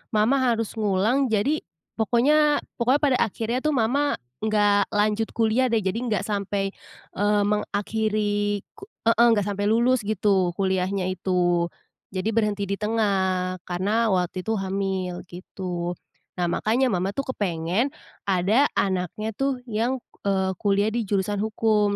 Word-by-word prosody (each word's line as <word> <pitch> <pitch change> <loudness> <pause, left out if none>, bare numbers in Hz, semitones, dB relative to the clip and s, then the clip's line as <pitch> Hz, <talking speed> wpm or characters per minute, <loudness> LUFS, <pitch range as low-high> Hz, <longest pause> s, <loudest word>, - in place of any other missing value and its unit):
mama 220 +6 +4
harus 230 -4 0
ngulang 215 +7 +2
jadi, 245 +9 +1 0.4
pokoknya 290 +7 +3 0.2
pokoknya 255 +5 +3
pada 265 -3 +4
akhirnya 230 +3 -2
tuh 305 - +2
mama 270 +5 +1 0.3
nggak 205 -2 +2
lanjut 210 +1 +1
kuliah 230 +3 +2
deh 225 - +3
jadi 190 +4 -1
nggak 215 -6 -1
sampai, 200 -1 -1 0.4
eee, 205 0 +2
mengakhiri 205 0 -1
ku 435 - -13 0.2
heeh, 230 - +5
enggak 210 -4 +3
sampai 205 0 -1
lulus 240 +3 +3
gitu 195 -4 +1
kuliahnya 190 0 0
itu. 175 -2 +1 0.5
Jadi 190 +3 -1
berhenti 210 -2 +1
di 200 - -1
tengah 190 -4 0
karena 200 +6 0
waktu 180 0 -1
itu 225 - 0
hamil 190 -2 -2
gitu. 175 -1 -5 0.4
Nah 175 - +1
makanya 235 +8 +1
mama 185 -2 0
tuh 275 - -3
kepengen, 180 +5 0 0.4
ada 200 +9 +3
anaknya 190 +3 -1
tuh 270 +2 -1
yang, 230 +4 0 0.3
eee, 190 -1 +1
kuliah 200 +1 +2
di 230 0 -1
jurusan 200 +1 0
hukum 215 -1 +1
205 Hz, 135 wpm, -24 LUFS, 190-225 Hz, 0.5 s, heeh